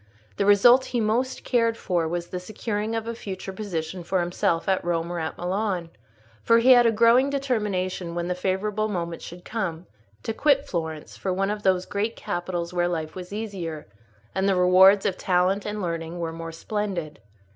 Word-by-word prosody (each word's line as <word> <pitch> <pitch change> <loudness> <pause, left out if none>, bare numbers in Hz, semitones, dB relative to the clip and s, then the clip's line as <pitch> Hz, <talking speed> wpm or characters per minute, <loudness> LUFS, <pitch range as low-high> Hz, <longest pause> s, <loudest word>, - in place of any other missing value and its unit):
The 200 - +1
result 240 +6 +6
he 245 - -2
most 230 +4 0
cared 230 -2 +1
for 175 -6 -1
was 175 +1 -3
the 180 - -4
securing 210 +3 -3
of 225 -1 -2
a 230 - -2
future 190 -3 -6
position 180 -3 -4
for 185 +2 0
himself 175 0 0
at 190 -1 +1
Rome 170 0 -1
or 175 - -3
at 160 -1 -4
Milan; 180 -2 -2 0.5
for 230 - +4
he 240 +3 +5
had 245 -2 +7
a - - +4
growing 235 +5 +4
determination, 205 -10 -2
when 175 0 -2
the 180 - 0
favourable 195 +4 -1
moment 170 -5 -4
should 175 +1 -10
come, 185 -7 -3 0.4
to 225 - -2
quit 280 +2 +3
Florence 160 -3 -4
for 190 - -2
one 195 +2 0
of 210 0 -4
those 185 -2 +2
great 215 +3 -2
capitals 175 0 -4
where 175 -1 +1
life 160 -3 -3
was 180 0 -8
easier, 195 -8 -5 0.5
and 190 +1 +1
the 195 - +3
rewards 185 +2 +6
of 190 -2 0
talent 185 +2 +1
and 210 -1 -3
learning 165 0 -3
were 165 -1 -3
more 165 0 -6
splendid. 175 -3 -4
190 Hz, 190 wpm, -25 LUFS, 175-215 Hz, 0.5 s, had